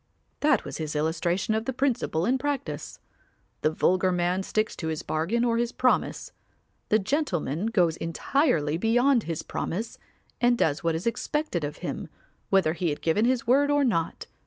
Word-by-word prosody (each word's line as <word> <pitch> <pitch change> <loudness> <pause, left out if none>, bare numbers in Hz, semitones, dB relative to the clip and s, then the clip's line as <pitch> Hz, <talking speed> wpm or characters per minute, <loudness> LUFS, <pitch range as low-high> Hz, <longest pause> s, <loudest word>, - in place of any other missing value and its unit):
That 300 +1 +2
was - - -5
his 155 -1 -4
illustration 170 +6 0
of 220 +1 -1
the 265 - -2
principle 245 - 0
in 260 +4 +2
practice; 285 0 -3 0.6
the - - +3
vulgar 185 +4 +2
man 180 +1 0
sticks 215 +3 -1
to 160 - -4
his 160 -1 -3
bargain 190 +10 0
or 230 -1 +1
his 240 0 0
promise; 255 - 0 0.6
the 215 - +5
gentleman 195 - -1
goes 175 -7 +2
entirely 165 - 0
beyond 245 +3 +3
his 165 -2 -3
promise 220 +6 -4 0.4
and 240 0 +4
does 145 -7 +1
what 165 -1 +1
is 165 - -4
expected 235 - -1
of 145 0 -4
him, - - -4 0.4
whether 185 -5 +3
he 175 0 -1
had 145 - -4
given 185 +7 +2
his 250 -1 +1
word 275 +4 +4
or 290 0 +3
not. 170 -11 -1
195 Hz, 170 wpm, -26 LUFS, 165-245 Hz, 0.6 s, the